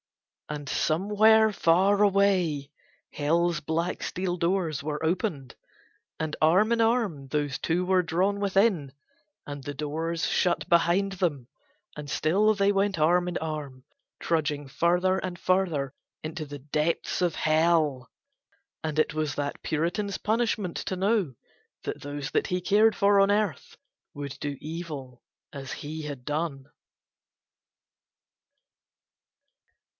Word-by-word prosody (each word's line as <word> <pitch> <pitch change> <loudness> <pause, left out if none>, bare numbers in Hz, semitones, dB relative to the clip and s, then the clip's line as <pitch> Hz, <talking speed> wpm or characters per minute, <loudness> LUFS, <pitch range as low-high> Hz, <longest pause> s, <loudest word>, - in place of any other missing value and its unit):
And 145 -1 -5
somewhere 210 +8 +3
far 195 +4 +3
away 185 -8 +2 0.4
Hell's 165 +3 +1
black 165 +3 -2
steel 180 -1 -2
doors 170 -4 -1
were 150 0 -3
opened, 160 - -2 0.6
and 155 -1 -2
arm 185 +9 +4
in 230 - +2
arm 225 - +1
those 145 -1 -1
two 175 +2 0
were 185 0 +3
drawn 185 +4 0
within, 195 -8 +2 0.5
and 145 -1 -7
the 145 +2 -6
doors 160 +3 -2
shut 175 -1 +1
behind 175 +3 +3
them 160 -10 -2 0.5
and 150 -1 -7
still 195 +10 +2
they 200 -1 +2
went 195 -2 +1
arm 175 +3 +3
in 175 - -3
arm, 145 -5 -5 0.3
trudging 150 -3 -1
further 180 +6 +2
and 180 -2 -5
further 170 -8 0 0.3
into 155 0 -5
the 145 0 -8
deeps 150 +6 -1
of 175 -3 +1
Hell, 155 -5 +2 0.7
and 155 -1 -3
it 155 - +2
was 155 -2 -2
that 145 0 -3
Puritan's 175 +6 -1
punishment 215 -4 -1
to 185 - -3
know 195 - +1 0.5
that - - -5
those 145 0 -5
that - - +1
he 180 - -1
cared 210 +4 +3
for 200 0 +4
on 195 +1 +4
Earth 210 0 -1 0.4
would 145 -2 -6
do 145 -1 -3
evil 150 -6 -7 0.3
as 135 -2 -7
he 155 +2 -6
had 145 -4 -7
done. 150 -3 -3
165 Hz, 130 wpm, -27 LUFS, 150-195 Hz, 0.7 s, arm